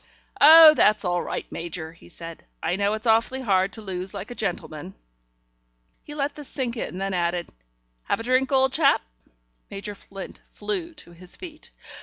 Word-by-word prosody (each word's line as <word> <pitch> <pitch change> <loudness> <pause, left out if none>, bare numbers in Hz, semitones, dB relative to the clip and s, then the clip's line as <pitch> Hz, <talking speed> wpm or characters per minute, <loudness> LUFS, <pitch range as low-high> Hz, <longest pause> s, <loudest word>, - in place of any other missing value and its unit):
"Oh, 315 +1 +10
that's 210 -8 +3
all 175 -1 0
right, - - -4
Major," 165 -1 -6
he 165 - -18
said. 165 -1 -10 0.2
"I 180 - 0
know 200 +1 +1
it's 220 +2 -4
awfully 230 +4 +2
hard 195 -4 +2
to 220 - -8
lose 190 0 -5
like 200 +5 -6
a - - -4
gentleman." 155 - -5 1.1
He 295 - -10
let 285 0 -1
this 295 -2 -9
sink 255 -4 -3
in, 205 -5 -4
then 195 0 -2
added: 175 -1 -1 0.6
"Have - - 0
a - - -5
drink, 255 +2 +1
old 265 -1 +3
chap?" 300 - +3 0.7
Major 200 +1 -6
Flint 195 -1 -10
flew 350 -5 -4
to 300 - -12
his 175 +1 -7
feet. 320 -4 -11
210 Hz, 175 wpm, -24 LUFS, 180-265 Hz, 1.1 s, Oh